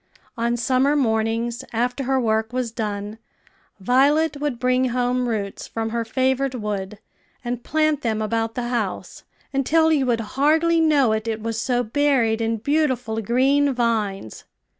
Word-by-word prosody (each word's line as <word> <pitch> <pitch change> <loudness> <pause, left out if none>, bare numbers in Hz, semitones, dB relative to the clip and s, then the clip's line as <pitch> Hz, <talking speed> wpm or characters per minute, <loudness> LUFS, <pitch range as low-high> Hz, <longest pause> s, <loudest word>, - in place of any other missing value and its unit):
On 235 +1 0
summer 260 +4 +2
mornings, 230 -2 0
after 245 +3 -1
her 265 +1 +1
work 220 -1 0
was 250 -2 -2
done, 210 -1 -4 0.6
Violet 285 +8 +2
would 290 -5 -1
bring 255 +1 +1
home 250 0 0
roots 205 -3 -4
from 225 -1 -4
her 235 0 -1
favorite 260 +3 0
wood, 210 -3 -4 0.5
and 245 0 -3
plant 310 -2 +1
them 220 -4 -1
about 225 +1 -1
the 240 -1 -3
house, 225 -6 -3 0.3
until 320 +4 +3
you 275 -4 +1
would 230 -2 +1 0.2
hardly 320 +3 +3
know 290 -7 +3
it, 220 +1 -2
it 225 -1 -2
was 225 -1 -2
so 245 0 0
buried 240 -3 +1
in 225 0 0
beautiful 250 -4 0
green 270 +5 +2
vines. 215 - -2
240 Hz, 150 wpm, -22 LUFS, 225-270 Hz, 0.6 s, until